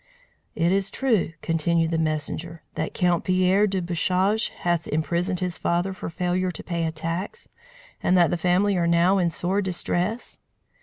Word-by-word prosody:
"Is 190 +4 +1
it - - -15
true," 225 -11 +1
continued 165 0 +1
the 165 - 0
messenger, 160 +1 -2
"that - - -4
Count 175 -2 +2
Pierre 185 +3 +3
de 190 -2 -2
Bouchage 185 +5 +1
hath 175 -2 -2
imprisoned 175 +4 -1
his 180 -2 -2
father 175 +3 0
for 190 - -6
failure 180 +2 -1
to 180 - -7
pay 170 -2 -2
a - - -2
tax, 165 - -5 0.5
and 185 - +3
that 175 -1 +4
the - - +1
family 185 +4 +2
are 170 -1 +1
now 170 +3 +4
in 175 -2 +2
sore 180 +4 -1
distress?" 185 +4 -2
175 Hz, 165 wpm, -24 LUFS, 170-190 Hz, 0.5 s, that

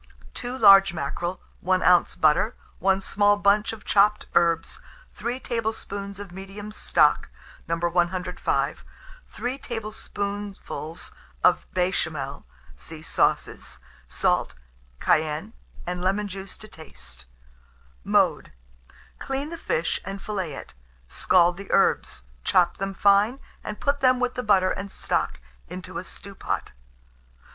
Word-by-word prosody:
2 245 +1 -4
large 195 -5 +7
mackerel, 175 +5 -3 0.2
1 185 +1 +1
oz. 180 -1 +5
butter, 160 +9 +3 0.2
1 195 0 +2
small 205 +1 +3
bunch 205 +1 +3
of 225 -2 -10
chopped 210 +1 +3
herbs, 165 -1 +2 0.3
3 240 +4 -3
tablespoonfuls 215 -5 -4
of 200 -3 -8
medium 195 +3 -8
stock, - - +2 0.4
No. 165 - +1
105, 175 +1 0 0.5
3 250 +2 -4
tablespoonfuls 205 - -5 0.3
of - - +4
béchamel 160 - -1 0.3
(see 155 - -11
Sauces); - - 0 0.3
salt, - - 0 0.4
cayenne, 155 +7 +1 0.3
and 180 0 -3
lemon 195 +3 +1
juice 195 0 -7
to 215 - -11
taste. 160 - -11 0.8
Mode. - - +2 0.7
Clean 270 +2 -3
the - - -4
fish, 165 - -1
and 195 +2 -6
fillet 190 -6 -3
it; - - -10 0.4
scald 175 -1 +3
the 195 0 -8
herbs, 60 - +2 0.2
chop - - +3
them 195 0 -3
fine, 205 +7 +4 0.2
and 210 - -6
put 285 0 +1
them 255 -2 +4
with 250 0 0
the - - -3
butter 195 -5 +3
and 200 0 -4
stock - - -1 0.3
into - - -6
a - - -6
stewpan. - - -5
195 Hz, 120 wpm, -25 LUFS, 175-210 Hz, 0.8 s, large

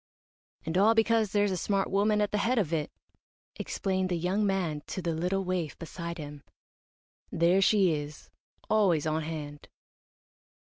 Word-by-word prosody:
"And 165 +3 0
all 220 +3 +5
because 225 -2 +2
there's 205 -1 +2
a - - 0
smart 195 +2 -1
woman 210 +2 +2
at 205 - 0
the 210 - 0
head 245 +4 +1
of 175 -7 0
it," 150 -2 -1 0.7
explained 190 -1 -2
the 175 - 0
young 185 +5 0
man 175 -6 -1
to - - -5
the 170 -2 -2
little 180 +4 -1
waif 180 -4 -2
beside 170 +1 -6
him. 145 -2 -8 0.9
"There 175 +3 +3
she 195 -3 +4
is 150 0 -7 0.4
always 185 -8 +2
on 155 0 0
hand." 150 -2 -7
185 Hz, 160 wpm, -29 LUFS, 160-200 Hz, 0.9 s, all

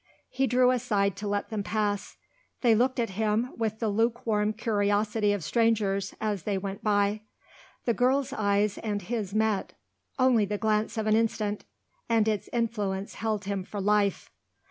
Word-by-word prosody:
He 265 +1 +1
drew 250 +1 +4
aside 210 -6 +1
to 205 +1 -4
let 205 0 -1
them 215 -2 -1
pass. 205 -1 -2 0.4
They 235 -3 +5
looked 250 +3 +2
at 230 -4 0
him 220 +4 0
with 220 -2 -2
the 225 - -1
lukewarm 220 -1 +1
curiosity 210 -1 +1
of 205 -4 -2
strangers, 205 -1 +1
as 210 -3 -1
they 200 +3 -1
went 195 0 -5
by. 205 0 +2 0.6
The 235 - +2
girl's 255 +3 +1
eyes 200 -1 +1
and 210 -2 -2
his 210 -1 -3
met. 215 -2 0 0.4
Only 255 -5 +4
the 205 +1 -2
glance 215 +1 0
of 220 - -1
an 215 0 +3
instant 215 -2 0 0.4
and 225 -2 +3
its 215 -2 -1
influence 210 -5 -2
held 215 -2 -2
him 200 -1 -2
for 205 +2 -6
life. 205 0 +1
215 Hz, 165 wpm, -28 LUFS, 205-230 Hz, 0.6 s, They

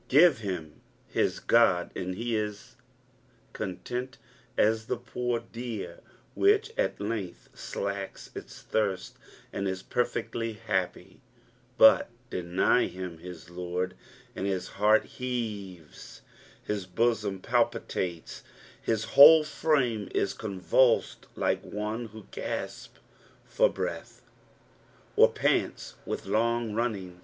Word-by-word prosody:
Give 155 0 +6
him 90 -8 -5 0.2
his - - 0
God 95 -7 +3
and 90 0 -3
he 115 +2 -2
is 105 +3 -3
as - - -26 0.8
content 125 +6 -5 0.4
sa 110 - +5 0.2
the - - -1
poor 120 0 -2
deer 115 -2 -6 0.3
which 425 +3 +3
at - - 0
length 100 -6 -4
alakea 100 -1 -5
its - - -9
thirst 100 -4 -1 0.4
and 100 - -2
is 95 0 -3
perfectly 115 -2 -2
ha[ipy; 95 -3 -2 0.6
but 110 - +7 0.2
deny 90 +7 +2
him 90 -3 -7
his 90 0 -10
Lord, 90 +1 -3 0.4
and 95 - -2
his 95 -2 -2
heart 105 +2 +4
heavea, 105 -8 -4 0.8
hia 105 -1 -1 0.2
bosom 110 -4 +1
palpitnles, 85 -2 -1 0.4
his 115 -1 0
whole 155 +5 +9
frame 140 -8 0
is 100 - +1
convulsed, 110 +4 +1
like - - 0
one 105 +3 -4
who 110 -1 -12
gasps - - -5 0.5
for - - +3
breath, - - -5 0.9
or - - +7
pants - - 0
with - - -3
long 115 0 +1
running. 100 -6 -2
105 Hz, 110 wpm, -28 LUFS, 95-120 Hz, 0.9 s, whole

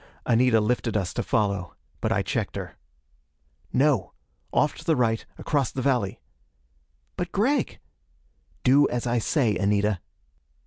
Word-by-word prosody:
Anita 120 -1 +4
lifted 115 0 0
us 95 -2 -2
to - - -1
follow. 100 -5 -1 0.2
But - - -1
I - - +2
checked - - -2
her. - - -6 1.0
"No! 130 -8 +2 0.4
Off 150 - +2
to - - -10
the 160 - +2
right, 115 -3 +1
across 140 -6 0
the 130 - -3
valley." 125 -8 0 1.0
"But 175 -1 -3
Gregg!" 250 +9 +1 0.9
"Do 140 +3 +5
as 120 0 -2
I 120 0 +1
say, 115 -2 +1
Anita." 100 -1 +1
120 Hz, 135 wpm, -25 LUFS, 105-140 Hz, 1.0 s, Do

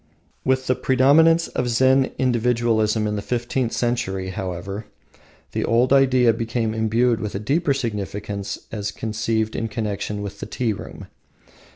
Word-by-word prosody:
With 130 0 +1
the 130 - +2
predominance 150 +7 +4
of 125 - -2
Zen 130 +3 +3
individualism 115 -3 +1
in 105 0 -1
the - - -2
fifteenth 120 +2 -1
century, 95 -6 -1
however, 95 +3 -5 0.6
the - - -1
old 120 +3 +3
idea 130 -3 +5
became 115 0 -2
imbued 115 +2 +1
with 105 -3 -4
a - - -1
deeper 140 +6 +1
significance 105 -4 -4
as 105 -2 -3
conceived 110 +1 -2
in 115 - -1
connection 105 -2 -3
with 100 - -7
the - - -6
tea 120 -4 -1
room. - - -9
115 Hz, 145 wpm, -22 LUFS, 105-125 Hz, 0.6 s, idea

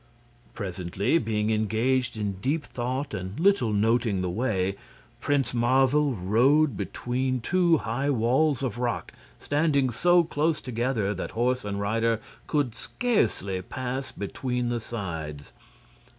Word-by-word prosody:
Presently, 100 - -1
being 110 -1 0
engaged 115 +3 +1
in 100 -3 -3
deep 145 +6 0
thought 130 +3 -3
and 95 +5 -5
little 190 - +3
noting 110 -1 +2
the 90 - -1
way, 100 -3 0 0.4
Prince 140 -3 0
Marvel 135 +3 +3
rode 125 +9 +3
between 125 +6 -2
two 175 +5 +3
high 135 +3 -2
walls 135 +3 +2
of 120 -3 -2
rock 120 -2 -2 0.2
standing 145 -3 +1
so 175 +8 +4
close 155 0 0
together 120 -4 -1
that 95 - -4
horse 125 +1 +1
and 100 -1 -3
rider 115 +2 +1 0.3
could 145 -6 0
scarcely 115 - -1
pass 130 +6 -4
between 125 +4 -3
the 120 -1 -1
sides. 80 - -6
120 Hz, 125 wpm, -26 LUFS, 105-135 Hz, 0.4 s, so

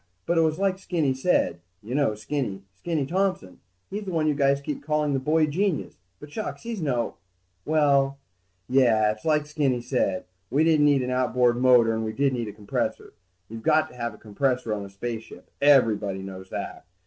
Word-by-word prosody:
But 170 -1 +2
it - - +5
was 155 -1 +1
like 190 -1 0
Skinny 165 -8 0
said... 130 - +1 0.2
You 115 +4 -6
know, 140 -6 +1
Skinny. 105 -3 -3
Skinny 155 - -2
Thompson. 180 - -1 0.3
He's 205 +2 -4
the - - -4
one 160 -3 0
you 155 - +3
guys 140 -1 +2
keep 140 0 -5
calling 150 -1 0
the 135 - +1
boy 155 +4 +2
genius, 175 +3 -1 0.2
but 150 - -11
shucks, 215 +7 -5
he's 230 -4 -4
no... 125 -6 -1 0.5
Well, 140 -3 +3 0.5
yeah, 115 -5 +4
it's 110 0 -10
like 150 -2 +2
Skinny 145 -5 0
said, 120 -7 -1 0.2
we 145 +4 +2
didn't 155 -2 +4
need 140 -3 +3
an 125 - -2
outboard 125 -1 +2
motor, 125 -3 +5
and 110 0 -2
we 110 0 -3
did 140 +1 +1
need 120 -3 -2
a - - -5
compressor. 105 0 -3 0.3
You've 115 +2 -8
got 155 +7 +3
to - - -15
have 120 -2 -4
a - - -16
compressor 125 +2 -1
on 100 -1 -4
a - - -10
spaceship, 110 +3 -7
everybody 110 -9 +3
knows 95 -1 -9
that. - - -6
135 Hz, 195 wpm, -25 LUFS, 115-155 Hz, 0.5 s, it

